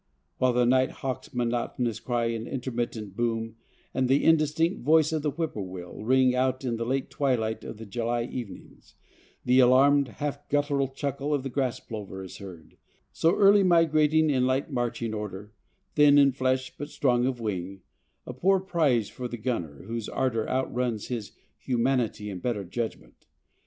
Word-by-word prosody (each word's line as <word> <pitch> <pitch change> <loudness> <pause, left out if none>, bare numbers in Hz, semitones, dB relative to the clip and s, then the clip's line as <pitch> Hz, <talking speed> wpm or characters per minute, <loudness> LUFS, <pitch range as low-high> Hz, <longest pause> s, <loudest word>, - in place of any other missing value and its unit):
While 130 -1 +3
the 125 0 +3
nighthawk's 130 0 0
monotonous 120 -1 -1
cry 120 -2 -1
and 115 0 -4
intermittent 120 -6 -4
boom 115 -1 -2 0.4
and 130 -1 0
the 135 +2 +3
indistinct 160 +2 +2
voice 155 +3 +4
of 160 -1 -1
the 150 - 0
whippoorwill 95 - -5
ring 130 +2 +4
out 130 +1 0
in 120 -2 -1
the 115 0 -3
late 135 +1 -1
twilight 115 -6 0
of - - -7
the 110 - -9
July 115 +3 -1
evenings, 120 -3 -9 0.5
the 125 +1 +4
alarmed, 135 +3 +5
half 145 0 -5
guttural 145 -1 +1
chuckle 140 +2 -2
of 135 - -3
the 135 - -4
grass 130 -2 -1
plover 100 -4 -7
is 95 - -9
heard, 90 -5 -11 0.3
so 165 +4 +2
early 200 0 +6
migrating 160 -3 +4
in 130 -2 +2
light 135 +3 0
marching 120 -3 -2
order, 105 0 -6 0.4
thin 145 -1 +6
in 140 -1 +6
flesh 130 0 -1
but 145 +1 -5
strong 125 -4 +1
of 130 -2 -2
wing, 95 -3 -4 0.4
a 125 - -6
poor 190 +9 +3
prize 155 - +1
for 125 -1 -6
the 120 - -6
gunner 105 - -4
whose 115 -1 -5
ardor 120 -4 -1
outruns 125 -4 -1
his 115 -4 -4 0.3
humanity 120 -4 0
and 90 -2 -7
better 110 -3 -2
judgment. 110 +5 -6
125 Hz, 160 wpm, -27 LUFS, 115-140 Hz, 0.5 s, early